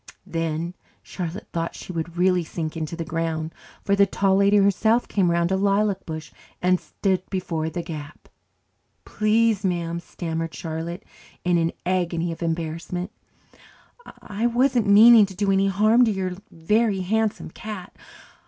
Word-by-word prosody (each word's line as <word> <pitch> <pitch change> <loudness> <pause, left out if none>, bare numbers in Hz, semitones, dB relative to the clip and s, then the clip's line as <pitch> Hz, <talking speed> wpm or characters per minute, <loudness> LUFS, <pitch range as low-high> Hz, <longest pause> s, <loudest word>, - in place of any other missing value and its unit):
Then 165 +1 -2 0.3
Charlotte 180 +3 -6
thought 165 0 -2
she 185 - -8
would 170 +1 -4
really 180 0 +3
sink 160 0 -5
into 160 0 -4
the 165 -1 -4
ground, 160 -1 -3 0.3
for 200 - +2
the 200 0 +4
Tall 195 0 +2
Lady 200 +1 +4
herself 220 +4 +3
came 190 -4 +1
around 170 +1 +1
a - - +3
lilac 200 0 +1
bush 155 -1 -6 0.3
and 180 0 +2
stood 190 -2 -1
before 165 -4 -2
the 175 +1 -4
gap. 155 -2 -8 0.8
"Please, 215 -1 +2
ma'am," 170 -2 -1
stammered 165 -1 -5
Charlotte 165 +2 -5 0.4
in 175 -1 +2
an 165 0 +1
agony 175 -2 0
of 165 - -8
embarrassment, 170 +3 -3 1.1
"I 215 +3 -1
wasn't 245 -1 +2
meaning 215 +1 +8
to 190 - -11
do 200 +1 +1
any 195 0 +3
harm 215 +5 +4
to 225 - +1
your 190 -2 -2 0.2
Very 205 +4 +1
Handsome 220 +3 -1
Cat. 210 -4 -8
180 Hz, 150 wpm, -24 LUFS, 165-200 Hz, 1.1 s, meaning